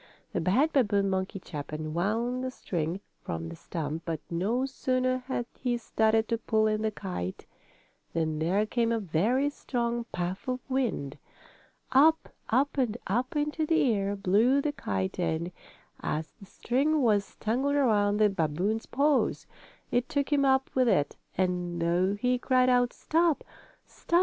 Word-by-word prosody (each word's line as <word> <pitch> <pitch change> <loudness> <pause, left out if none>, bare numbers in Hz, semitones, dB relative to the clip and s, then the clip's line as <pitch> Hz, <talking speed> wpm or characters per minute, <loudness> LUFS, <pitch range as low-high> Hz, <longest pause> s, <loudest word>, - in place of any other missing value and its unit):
The - - 0
bad 255 - +2
babboon 205 -7 +2
monkey 190 +2 -2
chap 150 -6 -7
unwound 200 +12 -1
the 260 - -1
string 175 -6 -3 0.2
from 80 0 -4
the 85 - -7
stump, 155 - -4
but 165 -2 -3
no 215 +10 0
sooner 255 -1 0
had 250 -3 -2
he 245 -2 0
started 220 -1 +1
to 230 -1 0
pull 220 -1 +1
in 215 0 +1
the 220 - +1
kite 180 - -5 0.7
than 160 -2 -1
there 185 +7 +2
came 230 +1 0
a 230 - +2
very 215 - +1
strong 240 -4 -2
puff 180 +4 -3
of 255 0 -1
wind. 245 - -1 0.7
Up, 310 +5 +5 0.2
up 275 +4 +2
and 240 -3 +1
up 245 +8 -1
into 300 +2 0
the 290 -7 +3
air 200 0 -1
blew 210 +8 +3
the 290 +1 0
kite 95 - -3
and, 170 0 -1 0.5
as 155 +1 -3
the 195 - -13
string 280 +8 +1
was 205 -4 +1
tangled 265 +6 0
around 210 -7 +3
the 215 0 +5
babboon's 190 +5 -1
paws, 285 +2 +1 0.5
it 245 +1 +1
took 285 0 0
him 280 -1 +3
up 265 -1 +2
with 255 -1 +3
it, 145 -10 +2 0.2
and 180 -2 0
though 175 +4 +2
he 250 +4 +1
cried 255 0 +3
out: 245 -1 +3
"Stop! 330 -1 +1 0.4
Stop! 340 - 0
220 Hz, 160 wpm, -29 LUFS, 180-255 Hz, 0.7 s, Up